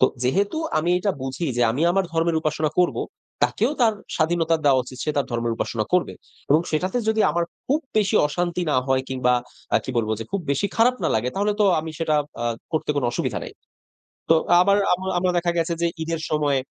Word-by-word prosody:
তো 130 Hz, -, +7 dB, 0.2 s
যেহেতু 200 Hz, -, +1 dB, 0.2 s
আমি 170 Hz, +3 st, 0 dB
এটা 200 Hz, +3 st, 0 dB
বুঝি 135 Hz, +5 st, -3 dB
যে, 120 Hz, -, +2 dB
আমি 135 Hz, +7 st, -1 dB
আমার 195 Hz, 0 st, +2 dB
ধর্মের 165 Hz, 0 st, +1 dB
উপাসনা 155 Hz, -1 st, -1 dB
করবো, 180 Hz, -, +2 dB, 0.4 s
তাকেও -, -, +2 dB
তার 225 Hz, -3 st, +4 dB, 0.2 s
স্বাধীনতা 165 Hz, 0 st, +2 dB
দেওয়া 135 Hz, -2 st, +5 dB
উচিত। 125 Hz, +1 st, -11 dB
সে 155 Hz, -, 0 dB
তার 140 Hz, -, +1 dB
ধর্মের 120 Hz, -1 st, -1 dB
উপাসনা 110 Hz, -2 st, -2 dB
করবে 180 Hz, -, +2 dB, 0.4 s
এবং 150 Hz, +3 st, +6 dB
সেটাতে 185 Hz, +9 st, 0 dB
যদি 220 Hz, 0 st, +2 dB
আমার 170 Hz, 0 st, 0 dB, 0.2 s
খুব 290 Hz, +4 st, +1 dB, 0.2 s
বেশি 210 Hz, -1 st, +3 dB
অশান্তি 175 Hz, +3 st, -2 dB
না 130 Hz, -, +2 dB
হয় 130 Hz, -1 st, +2 dB
কিংবা 130 Hz, -1 st, +1 dB, 0.4 s
আ -, -, +7 dB
কি -, -, -4 dB
বলব 110 Hz, -2 st, 0 dB
যে, 115 Hz, -, -5 dB
খুব 200 Hz, -, 0 dB
বেশি 140 Hz, +8 st, +1 dB
খারাপ 240 Hz, +3 st, +4 dB
না -, -, +3 dB
লাগে 115 Hz, +3 st, 0 dB
তাহলে 205 Hz, +2 st, +1 dB
তো -, -, +5 dB, 0.2 s
আমি 160 Hz, +1 st, -6 dB
সেটা 160 Hz, -2 st, 0 dB, 0.3 s
আ -, -, -1 dB, 0.3 s
করতে 155 Hz, -1 st, -1 dB
কোনো 130 Hz, -4 st, +1 dB
অসুবিধা 120 Hz, -, -2 dB
নাই। -, -, -9 dB, 0.8 s
তো 165 Hz, -, +7 dB, 0.3 s
আবার 200 Hz, +2 st, +4 dB, 0.2 s
আমার 190 Hz, +1 st, -2 dB
আমরা 180 Hz, 0 st, +1 dB
দেখা 175 Hz, 0 st, +1 dB
গেছে 170 Hz, 0 st, 0 dB
যে, 170 Hz, -, +3 dB, 0.2 s
ঈদের 165 Hz, 0 st, -3 dB
সময় 145 Hz, -3 st, +2 dB
165 Hz, 210 wpm, -23 LUFS, 135-180 Hz, 0.8 s, তো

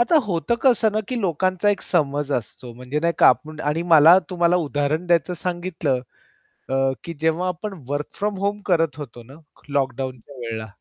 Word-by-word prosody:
आता 315 Hz, +7 st, +4 dB
होतं 190 Hz, +5 st, 0 dB
कसं 240 Hz, -4 st, +4 dB
ना 215 Hz, -, 0 dB
की 255 Hz, -, -1 dB
लोकांचा 185 Hz, +2 st, 0 dB
एक 200 Hz, -, -1 dB
समज 145 Hz, -1 st, 0 dB
असतो 120 Hz, 0 st, -5 dB
म्हणजे 125 Hz, +5 st, -4 dB
नाही 170 Hz, +1 st, +1 dB
का -, -, +7 dB
आपण 155 Hz, 0 st, 0 dB
आणि 165 Hz, +3 st, -1 dB
मला 160 Hz, +4 st, +8 dB
तुम्हाला 175 Hz, 0 st, +2 dB
उदाहरण 145 Hz, +4 st, -1 dB
द्यायचं 175 Hz, 0 st, +2 dB
सांगितलं 175 Hz, -7 st, -2 dB, 0.7 s
अ, 135 Hz, 0 st, +1 dB
की 170 Hz, -, -6 dB
जेव्हा 160 Hz, +3 st, +1 dB
आपण 185 Hz, +4 st, -4 dB, 0.2 s
वर्क 145 Hz, +1 st, -2 dB
फ्रॉम 205 Hz, -1 st, -2 dB
होम 205 Hz, +1 st, -1 dB
करत 165 Hz, -6 st, +1 dB
होतो 120 Hz, -5 st, -9 dB
ना 130 Hz, +4 st, -15 dB, 0.4 s
लॉक 135 Hz, -3 st, 0 dB
डाउनच्या 130 Hz, 0 st, -6 dB
वेळेला 115 Hz, -2 st, -5 dB
160 Hz, 180 wpm, -22 LUFS, 135-180 Hz, 0.7 s, मला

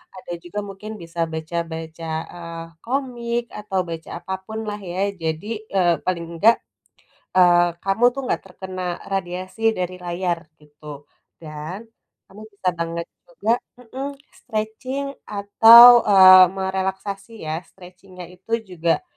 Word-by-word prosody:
ada 185 Hz, -1 st, -10 dB
juga 175 Hz, +4 st, -5 dB
mungkin 195 Hz, +2 st, -9 dB
bisa 165 Hz, 0 st, -9 dB
baca-baca, 160 Hz, 0 st, -5 dB, 0.3 s
eee, 170 Hz, -1 st, -7 dB, 0.2 s
komik, 240 Hz, -2 st, -2 dB, 0.2 s
atau 200 Hz, -2 st, -2 dB
baca 165 Hz, -1 st, -7 dB
apa 190 Hz, -, -6 dB
pun, 220 Hz, +3 st, -6 dB
lah, 210 Hz, -, -3 dB, 0.2 s
ya. 180 Hz, -, -4 dB, 0.2 s
Jadi, 160 Hz, +4 st, -3 dB, 0.3 s
eee, 175 Hz, -3 st, +4 dB
paling 170 Hz, -2 st, -1 dB
nggak, 220 Hz, +7 st, +5 dB, 0.8 s
eee, 175 Hz, -1 st, +6 dB, 0.2 s
kamu 195 Hz, +4 st, 0 dB
tuh 275 Hz, -, -3 dB
nggak -, -, -1 dB
terkena 185 Hz, 0 st, -8 dB, 0.3 s
radiasi 185 Hz, +2 st, -4 dB, 0.2 s
dari 180 Hz, 0 st, -3 dB
layar, 175 Hz, 0 st, -2 dB, 0.2 s
gitu. 150 Hz, -1 st, -12 dB, 0.4 s
Dan, 155 Hz, +4 st, -7 dB, 0.5 s
kamu 205 Hz, +2 st, -13 dB
bisa 195 Hz, -2 st, -1 dB
banget 170 Hz, 0 st, -3 dB, 0.2 s
juga 200 Hz, +6 st, -2 dB, 0.3 s
mhm, 255 Hz, +3 st, -7 dB, 0.3 s
stretching, 250 Hz, +4 st, -4 dB, 0.2 s
atau, 225 Hz, +4 st, +8 dB
eee, 185 Hz, -2 st, +9 dB
merelaksasi, 190 Hz, +2 st, -3 dB
ya. 155 Hz, +1 st, -3 dB
Stretching-nya 180 Hz, 0 st, -13 dB
itu 185 Hz, +5 st, -17 dB, 0.2 s
juga, 170 Hz, -, 0 dB
185 Hz, 125 wpm, -22 LUFS, 170-210 Hz, 0.8 s, eee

